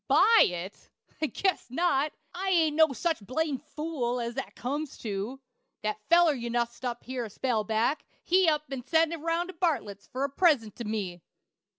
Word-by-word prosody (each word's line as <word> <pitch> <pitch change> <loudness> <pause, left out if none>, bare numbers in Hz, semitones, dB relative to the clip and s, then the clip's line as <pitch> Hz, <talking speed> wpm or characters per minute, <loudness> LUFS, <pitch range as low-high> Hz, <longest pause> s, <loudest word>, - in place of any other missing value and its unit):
"Buy 460 0 +6
it! 180 +2 -7 0.3
I 310 - +2
guess 380 -3 -1
not. 295 0 +1 0.2
I 380 +2 -2
ain't 325 -5 +3
no 315 -1 +5
such 320 -3 -1
blamed 280 +4 -1
fool 300 -6 -3
as 235 0 -3
that - - -5
comes 285 +3 -4
to. 215 +4 -3 0.4
That 215 0 -2
feller 340 -2 +6
you 240 -3 -4
nussed 235 +1 -2
up 240 -1 -3
here 255 -1 -4
a - - -7
spell 225 0 -1
back, 225 +7 0 0.2
he 365 -1 +4
up 300 -1 +1
an' 260 -2 -4
sent 325 +3 +2
it - - -3
roun' 330 +2 0
to 370 - -8
Bartlett's, 275 - -1
for 265 0 -3
a 280 - 0
present 275 - +2
to 235 - -5
me." 195 -5 -3
270 Hz, 190 wpm, -28 LUFS, 235-325 Hz, 0.4 s, Buy